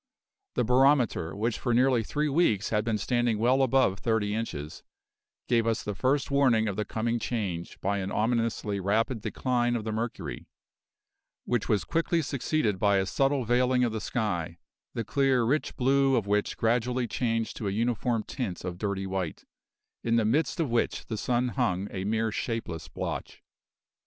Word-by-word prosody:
The -, -, +2 dB
barometer, 125 Hz, -, +3 dB
which 110 Hz, +2 st, -1 dB
for 120 Hz, -2 st, 0 dB
nearly 125 Hz, -2 st, +3 dB
three 150 Hz, +6 st, -1 dB
weeks 135 Hz, -, +2 dB
had 105 Hz, -1 st, +2 dB
been 115 Hz, -1 st, 0 dB
standing 120 Hz, +1 st, +1 dB
well 125 Hz, +5 st, +3 dB
above 130 Hz, -7 st, +3 dB
thirty 110 Hz, -3 st, 0 dB
inches, 75 Hz, -10 st, -4 dB, 0.7 s
gave 115 Hz, -2 st, +2 dB
us 115 Hz, -1 st, 0 dB
the 105 Hz, -, -3 dB
first 135 Hz, +7 st, 0 dB
warning 125 Hz, -6 st, +3 dB
of 100 Hz, -, -2 dB
the 105 Hz, -, -2 dB
coming 115 Hz, +3 st, -1 dB
change 95 Hz, -9 st, -3 dB
by 100 Hz, +1 st, 0 dB
an 95 Hz, 0 st, -3 dB
ominously 115 Hz, -2 st, 0 dB
rapid 110 Hz, +5 st, 0 dB
decline 120 Hz, +1 st, 0 dB
of 115 Hz, -, -2 dB
the 110 Hz, -, -3 dB
mercury, 110 Hz, -, -4 dB, 1.0 s
which 120 Hz, -3 st, -1 dB
was 105 Hz, -6 st, +2 dB
quickly 165 Hz, -, 0 dB
succeeded 130 Hz, -6 st, -1 dB
by 100 Hz, -1 st, +3 dB
a 95 Hz, -, +1 dB
subtle 135 Hz, +4 st, +1 dB
veiling 125 Hz, +2 st, +3 dB
of 120 Hz, -, +1 dB
the 110 Hz, -, -3 dB
sky, 90 Hz, -9 st, -2 dB, 0.4 s
the 115 Hz, -, -1 dB
clear, 135 Hz, +1 st, +2 dB
rich 140 Hz, +7 st, 0 dB
blue 135 Hz, +1 st, +3 dB
of 115 Hz, -5 st, +1 dB
which 105 Hz, 0 st, 0 dB
gradually 120 Hz, +2 st, +1 dB
changed 115 Hz, -1 st, -1 dB
to 105 Hz, -, -3 dB
a -, -, 0 dB
uniform 115 Hz, +1 st, 0 dB
tint 105 Hz, -9 st, -5 dB
of 90 Hz, -1 st, -5 dB
dirty 100 Hz, -2 st, -2 dB
white, 95 Hz, -4 st, -4 dB, 0.6 s
in 115 Hz, 0 st, +1 dB
the 115 Hz, -2 st, +3 dB
midst 150 Hz, -, +1 dB
of 155 Hz, -7 st, 0 dB
which 120 Hz, -, 0 dB
the 110 Hz, -, -4 dB
sun 125 Hz, +3 st, 0 dB
hung 95 Hz, -2 st, 0 dB
a 95 Hz, 0 st, -4 dB
mere 110 Hz, +1 st, 0 dB
shapeless 110 Hz, -8 st, -4 dB
blotch. -, -, -5 dB
115 Hz, 170 wpm, -28 LUFS, 105-125 Hz, 1.0 s, barometer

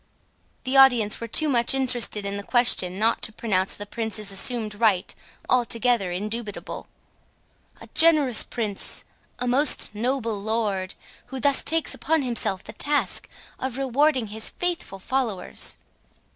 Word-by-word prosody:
The 260 Hz, +1 st, -2 dB
audience 245 Hz, -6 st, +5 dB
were 230 Hz, -, -4 dB
too 310 Hz, +7 st, +4 dB
much 245 Hz, -1 st, +3 dB
interested 245 Hz, -6 st, +1 dB
in 200 Hz, 0 st, -2 dB
the 200 Hz, -, -4 dB
question 200 Hz, -7 st, +3 dB
not 225 Hz, +3 st, +1 dB
to -, -, 0 dB
pronounce 195 Hz, -4 st, -1 dB
the 205 Hz, -, -7 dB
Prince's 215 Hz, -1 st, -4 dB
assumed 215 Hz, +2 st, -1 dB
right 205 Hz, -3 st, +1 dB, 0.3 s
altogether 235 Hz, -5 st, +1 dB
indubitable. 210 Hz, +3 st, -5 dB, 0.9 s
"A -, -, -11 dB
generous 305 Hz, -7 st, +5 dB
Prince!—a 220 Hz, +2 st, -6 dB
most 255 Hz, -1 st, +2 dB
noble 230 Hz, -1 st, -2 dB
Lord, 205 Hz, -3 st, -2 dB, 0.3 s
who 265 Hz, -, -7 dB
thus 280 Hz, 0 st, +2 dB
takes 325 Hz, 0 st, 0 dB
upon 320 Hz, -2 st, 0 dB
himself 230 Hz, -6 st, -1 dB
the 215 Hz, -, -11 dB
task 290 Hz, +6 st, -1 dB, 0.3 s
of 260 Hz, -1 st, -4 dB
rewarding 270 Hz, 0 st, +1 dB
his 220 Hz, 0 st, -4 dB
faithful 350 Hz, -, -4 dB
followers!" 230 Hz, -1 st, -2 dB
230 Hz, 130 wpm, -24 LUFS, 210-265 Hz, 0.9 s, audience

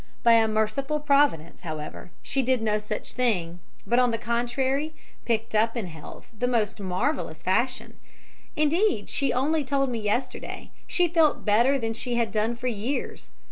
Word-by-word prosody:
By 235 Hz, -, +7 dB
a 225 Hz, -1 st, +5 dB
merciful 220 Hz, +8 st, 0 dB
providence, 280 Hz, -, +2 dB
however, 155 Hz, 0 st, -6 dB
she 270 Hz, -, 0 dB
did 260 Hz, 0 st, +2 dB
no 215 Hz, -1 st, +1 dB
such 210 Hz, 0 st, -5 dB
thing, 180 Hz, -9 st, 0 dB, 0.3 s
but, 240 Hz, +5 st, +3 dB
on 250 Hz, -1 st, +4 dB
the 230 Hz, -, 0 dB
contrary, 260 Hz, +6 st, -1 dB, 0.3 s
picked 225 Hz, -1 st, -1 dB
up 225 Hz, +3 st, +2 dB
in 225 Hz, -, -2 dB
health 160 Hz, -3 st, -11 dB
in 215 Hz, -, -22 dB
the 245 Hz, -, +1 dB
most 225 Hz, -4 st, 0 dB
marvellous 185 Hz, -, -2 dB
fashion; 250 Hz, +7 st, -1 dB, 0.6 s
indeed, 305 Hz, -, +1 dB
she 275 Hz, -, +1 dB
only 295 Hz, +5 st, +1 dB
told 275 Hz, -1 st, 0 dB
me 235 Hz, -, -2 dB
yesterday, 215 Hz, +5 st, -3 dB, 0.2 s
she 355 Hz, -1 st, +2 dB
felt 325 Hz, -3 st, +2 dB
better 235 Hz, +6 st, +4 dB
than 225 Hz, -3 st, -2 dB
she 240 Hz, +1 st, -3 dB
had 230 Hz, -2 st, 0 dB
done 220 Hz, +2 st, 0 dB
for 235 Hz, -, -9 dB
years. 245 Hz, +3 st, -3 dB
235 Hz, 170 wpm, -26 LUFS, 215-275 Hz, 0.6 s, By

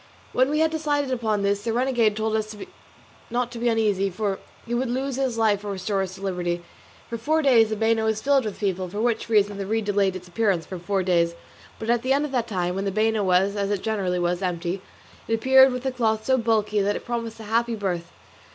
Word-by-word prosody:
When 260 Hz, +2 st, +3 dB
we 305 Hz, +2 st, +1 dB
had 320 Hz, 0 st, +3 dB
decided 290 Hz, -3 st, -1 dB
upon 220 Hz, -5 st, 0 dB
this 200 Hz, 0 st, +1 dB
the 230 Hz, -, -1 dB
renegade 240 Hz, -4 st, +2 dB
told 220 Hz, 0 st, 0 dB
us 215 Hz, -1 st, -3 dB, 0.7 s
not 245 Hz, 0 st, -1 dB
to 240 Hz, -, -7 dB
be 240 Hz, +1 st, +1 dB
uneasy, 210 Hz, -4 st, +1 dB
for 195 Hz, +1 st, -2 dB, 0.3 s
he 235 Hz, -, -4 dB
would 245 Hz, +1 st, 0 dB
lose 265 Hz, +2 st, -2 dB
his 260 Hz, -4 st, -1 dB
life 210 Hz, -3 st, +2 dB
or 205 Hz, -1 st, -3 dB
restore 195 Hz, +1 st, -1 dB
us 190 Hz, -1 st, -4 dB
to 195 Hz, -, -13 dB
liberty. 175 Hz, -2 st, -2 dB, 0.4 s
For 230 Hz, -, -5 dB
four 310 Hz, +6 st, +1 dB
days 235 Hz, -5 st, +5 dB
the 215 Hz, -, -1 dB
bano 225 Hz, +1 st, +1 dB
was 220 Hz, -1 st, +1 dB
filled 275 Hz, +1 st, +2 dB
with 210 Hz, -, -4 dB
people, 190 Hz, -3 st, -2 dB
for 205 Hz, +4 st, -5 dB
which 235 Hz, 0 st, 0 dB
reason 205 Hz, -2 st, +2 dB
the 195 Hz, -, -3 dB
reed 220 Hz, 0 st, 0 dB
delayed 200 Hz, -2 st, +1 dB
its 180 Hz, -1 st, -8 dB
appearance 180 Hz, -3 st, 0 dB
for 185 Hz, -, -7 dB
four 190 Hz, +2 st, -1 dB
days, 170 Hz, -2 st, +2 dB, 0.4 s
but 225 Hz, +1 st, -1 dB
at 240 Hz, -1 st, +2 dB
the 260 Hz, +2 st, +2 dB
end 285 Hz, +2 st, +1 dB
of 295 Hz, -, -6 dB
that 245 Hz, -3 st, 0 dB
time, 180 Hz, -4 st, -1 dB
when 195 Hz, +2 st, -3 dB
the 195 Hz, -, 0 dB
bano 215 Hz, +1 st, +1 dB
was, 190 Hz, +2 st, +2 dB
as 200 Hz, -1 st, -1 dB
it 205 Hz, -2 st, -1 dB
generally 195 Hz, -5 st, -1 dB
was, 175 Hz, +1 st, 0 dB
empty, 180 Hz, 0 st, -2 dB, 0.5 s
it 225 Hz, -, +2 dB
appeared 265 Hz, +3 st, +6 dB
with 250 Hz, 0 st, -4 dB
the 265 Hz, -, 0 dB
cloth 220 Hz, -3 st, 0 dB
so 260 Hz, -, +3 dB
bulky 220 Hz, -3 st, +1 dB
that 205 Hz, +1 st, +1 dB
it -, -, -6 dB
promised 230 Hz, -2 st, -4 dB
a -, -, -8 dB
happy 230 Hz, +2 st, 0 dB
birth. 180 Hz, -5 st, -3 dB
220 Hz, 240 wpm, -24 LUFS, 195-240 Hz, 0.7 s, appeared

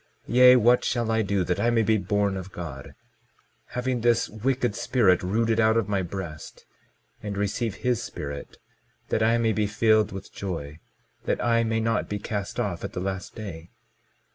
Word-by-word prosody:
Yea, 125 Hz, +1 st, +7 dB
what 120 Hz, +1 st, +4 dB
shall 120 Hz, -2 st, 0 dB
I 110 Hz, 0 st, +2 dB
do 100 Hz, -2 st, 0 dB
that 90 Hz, 0 st, -1 dB
I 120 Hz, -, +2 dB
may 115 Hz, -1 st, +3 dB
be 110 Hz, 0 st, +2 dB
born 100 Hz, -1 st, 0 dB
of 95 Hz, 0 st, -7 dB
God, 80 Hz, -7 st, -8 dB, 0.7 s
having 125 Hz, -1 st, -2 dB
this 120 Hz, 0 st, +3 dB
wicked 125 Hz, +1 st, -1 dB
spirit 115 Hz, -7 st, +2 dB
rooted 110 Hz, +4 st, +1 dB
out 110 Hz, 0 st, +4 dB
of 115 Hz, -, +1 dB
my 100 Hz, -2 st, 0 dB
breast, 85 Hz, -4 st, -7 dB, 0.6 s
and 100 Hz, -1 st, -5 dB
receive 105 Hz, +1 st, -1 dB
his 125 Hz, -1 st, 0 dB
Spirit, 70 Hz, -1 st, -7 dB, 0.5 s
that -, -, 0 dB
I 115 Hz, +2 st, +3 dB
may 115 Hz, -1 st, +1 dB
be 105 Hz, 0 st, 0 dB
filled 110 Hz, 0 st, +3 dB
with 95 Hz, 0 st, -9 dB
joy, 80 Hz, -6 st, -5 dB, 0.5 s
that -, -, 0 dB
I 115 Hz, -1 st, +2 dB
may 115 Hz, 0 st, 0 dB
not 115 Hz, -1 st, 0 dB
be 105 Hz, -, -2 dB
cast 100 Hz, -1 st, -4 dB
off 90 Hz, -5 st, -2 dB
at -, -, -5 dB
the -, -, -3 dB
last 95 Hz, +1 st, -4 dB
day? 85 Hz, -6 st, -8 dB
105 Hz, 180 wpm, -26 LUFS, 95-115 Hz, 0.7 s, Yea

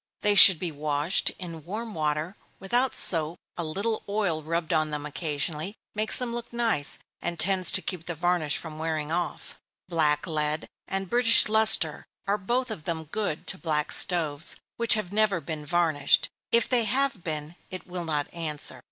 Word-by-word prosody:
They 205 Hz, -, +2 dB
should 190 Hz, -3 st, +11 dB
be 170 Hz, +1 st, -4 dB
washed 150 Hz, +3 st, 0 dB
in 165 Hz, -4 st, -8 dB
warm 215 Hz, +6 st, -6 dB
water, 155 Hz, +3 st, -2 dB, 0.2 s
without 245 Hz, +7 st, -1 dB
soap 165 Hz, -1 st, 0 dB, 0.2 s
a 170 Hz, -, -4 dB
little 200 Hz, +8 st, -3 dB
oil 200 Hz, -6 st, -1 dB
rubbed 165 Hz, +1 st, -3 dB
on 155 Hz, -1 st, +1 dB
them 150 Hz, -1 st, -5 dB
occasionally, 150 Hz, +5 st, -3 dB, 0.2 s
makes 215 Hz, +1 st, 0 dB
them 245 Hz, -2 st, -4 dB
look 235 Hz, 0 st, -6 dB
nice, 230 Hz, -12 st, 0 dB, 0.2 s
and 170 Hz, -, -4 dB
tends 185 Hz, +1 st, +2 dB
to 190 Hz, -, +4 dB
keep 175 Hz, -3 st, -6 dB
the 175 Hz, -, -4 dB
varnish 175 Hz, -3 st, 0 dB
from 155 Hz, -2 st, -8 dB
wearing 155 Hz, -1 st, -3 dB
off. 175 Hz, +1 st, -4 dB, 0.3 s
Black 155 Hz, -4 st, 0 dB
lead 155 Hz, -2 st, -3 dB, 0.2 s
and 195 Hz, 0 st, -4 dB
British 235 Hz, +2 st, +6 dB
Lustre 215 Hz, -8 st, +4 dB, 0.2 s
are 205 Hz, +1 st, -1 dB
both 240 Hz, +5 st, -2 dB
of 160 Hz, -8 st, -8 dB
them 165 Hz, -2 st, -3 dB
good 165 Hz, 0 st, -4 dB
to 185 Hz, -, -5 dB
black 150 Hz, -3 st, -2 dB
stoves 160 Hz, -4 st, +3 dB, 0.2 s
which 235 Hz, -1 st, +4 dB
have 205 Hz, -3 st, -5 dB
never 210 Hz, -4 st, +1 dB
been 155 Hz, -2 st, -7 dB
varnished 160 Hz, -4 st, +2 dB, 0.2 s
if 235 Hz, -, +2 dB
they 240 Hz, -3 st, +1 dB
have 265 Hz, -3 st, -1 dB
been, 155 Hz, 0 st, -5 dB
it 185 Hz, -, -8 dB
will 180 Hz, -1 st, -6 dB
not 150 Hz, -3 st, -2 dB
answer. 155 Hz, -3 st, -4 dB
170 Hz, 175 wpm, -26 LUFS, 155-205 Hz, 0.3 s, should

